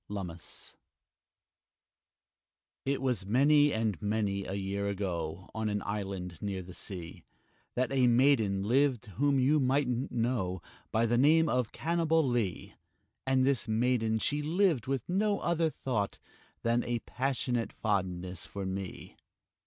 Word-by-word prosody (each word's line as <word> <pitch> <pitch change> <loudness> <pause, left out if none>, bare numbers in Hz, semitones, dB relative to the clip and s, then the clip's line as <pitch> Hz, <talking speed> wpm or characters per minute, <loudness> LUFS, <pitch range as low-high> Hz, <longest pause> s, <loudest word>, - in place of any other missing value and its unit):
LUMMIS 90 -5 -6 2.1
It 135 0 -1
was 125 -6 +1
many 145 +6 +5
and 110 - -1
many 105 -2 -1
a 95 - -4
year 100 +1 -2
ago, 90 -3 -3
On 110 -1 -1
an 105 0 -2
island 95 -4 -4
near 95 -2 -3
the 90 0 -11
sea, 90 -3 -6 0.5
That 130 +1 0
a 130 -2 +4
maiden 120 -6 +3
lived 125 +2 +2
whom 140 +1 +3
you 145 +4 +4
mightn't 130 -1 +1
know 115 -6 -1 0.3
By 115 +1 +2
the 120 +1 +2
name 160 +4 +5
of 125 -5 0
Cannibalee; 155 - 0 0.5
And 130 -1 +3
this 135 -3 +1
maiden 110 0 +1
she 145 +6 0
lived 160 - +1
with 135 -3 -2
no 205 +3 +1
other 170 -1 +1
thought 115 -9 -2 0.5
Than 115 +1 +2
a 120 0 -1
passionate 125 -3 -1
fondness 95 -3 -2
for 100 0 -5
me. 95 0 -6
115 Hz, 130 wpm, -31 LUFS, 100-135 Hz, 2.1 s, many